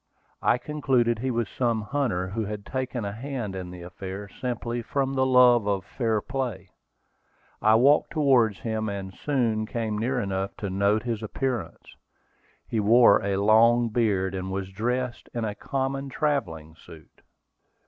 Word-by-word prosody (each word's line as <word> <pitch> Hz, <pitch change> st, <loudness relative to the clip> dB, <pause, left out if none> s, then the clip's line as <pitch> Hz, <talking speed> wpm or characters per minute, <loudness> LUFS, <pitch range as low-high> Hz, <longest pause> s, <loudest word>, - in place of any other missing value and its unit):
I -, -, +3 dB
concluded 125 Hz, -5 st, 0 dB
he 130 Hz, +3 st, -2 dB
was 120 Hz, -3 st, -1 dB
some 115 Hz, -1 st, -1 dB
hunter, 105 Hz, -7 st, -1 dB
who 110 Hz, +3 st, -2 dB
had 105 Hz, 0 st, -6 dB
taken 130 Hz, -3 st, -3 dB
a 100 Hz, -, -3 dB
hand 115 Hz, -3 st, -5 dB
in 90 Hz, -1 st, -6 dB
the 90 Hz, -1 st, -9 dB
affair 95 Hz, +3 st, -7 dB
simply 120 Hz, +1 st, -4 dB
from 135 Hz, +3 st, -1 dB
the 130 Hz, -1 st, +2 dB
love 125 Hz, -4 st, +5 dB
of 100 Hz, -3 st, -1 dB
fair 110 Hz, -2 st, -1 dB
play. 125 Hz, -6 st, -4 dB, 0.9 s
I 110 Hz, +1 st, +5 dB
walked 140 Hz, +6 st, +4 dB
towards 130 Hz, -, +3 dB
him, 110 Hz, -1 st, -2 dB
and 95 Hz, -1 st, -5 dB
soon 115 Hz, -6 st, -1 dB
came 110 Hz, -3 st, -2 dB
near 125 Hz, +3 st, 0 dB
enough 95 Hz, -2 st, -3 dB
to 100 Hz, -3 st, -4 dB
note 100 Hz, +3 st, +2 dB
his 115 Hz, -3 st, -3 dB
appearance. 120 Hz, -, -4 dB, 0.7 s
He 115 Hz, -, -1 dB
wore 110 Hz, +1 st, +6 dB
a 100 Hz, 0 st, 0 dB
long 115 Hz, +3 st, +4 dB
beard, 100 Hz, -5 st, +1 dB
and 95 Hz, 0 st, -4 dB
was 95 Hz, 0 st, -4 dB
dressed 120 Hz, +4 st, -3 dB
in 115 Hz, -2 st, -1 dB
a 105 Hz, -, -2 dB
common 135 Hz, +3 st, -3 dB
travelling 105 Hz, -, -2 dB
suit. 80 Hz, -1 st, -16 dB
115 Hz, 160 wpm, -26 LUFS, 100-125 Hz, 0.9 s, wore